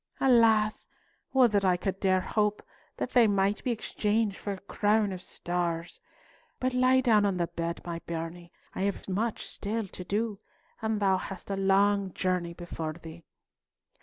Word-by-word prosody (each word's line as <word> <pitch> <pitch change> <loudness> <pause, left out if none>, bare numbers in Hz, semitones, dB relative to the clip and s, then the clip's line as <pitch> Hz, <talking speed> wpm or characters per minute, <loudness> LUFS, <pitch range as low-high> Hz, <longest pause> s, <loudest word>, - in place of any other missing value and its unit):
Alas! 225 -4 +4 0.4
would 255 -4 +5
that 200 -1 +2
I 185 -2 +3
could 190 +1 -3
dare 185 -1 +3
to - - -9
hope 210 -1 +1 0.3
they 245 -2 +3
might 200 0 +1
be - - -1
exchanged 215 -2 0
for 200 - -4
a 190 - -8
crown 210 +1 +1
of 185 -1 -6
stars! 175 -2 -3 0.6
But 255 0 0
lie 255 +1 +4
down 220 -5 +4
on 200 -2 +1
the 175 - +1
bed, 170 0 -4
my 170 -1 -4
bairnie. 170 +1 -6 0.2
I - - -4
have 200 0 -2
much 210 +4 -2
still 215 +1 -4
to 180 - -9
do, 210 +2 -2 0.4
and 220 -1 0
thou 195 -2 +3
hast 195 +1 -7
a - - 0
long 195 0 +2
journey 180 -2 -1
before 165 -3 -5
thee." 165 0 -12
200 Hz, 165 wpm, -29 LUFS, 180-215 Hz, 0.6 s, would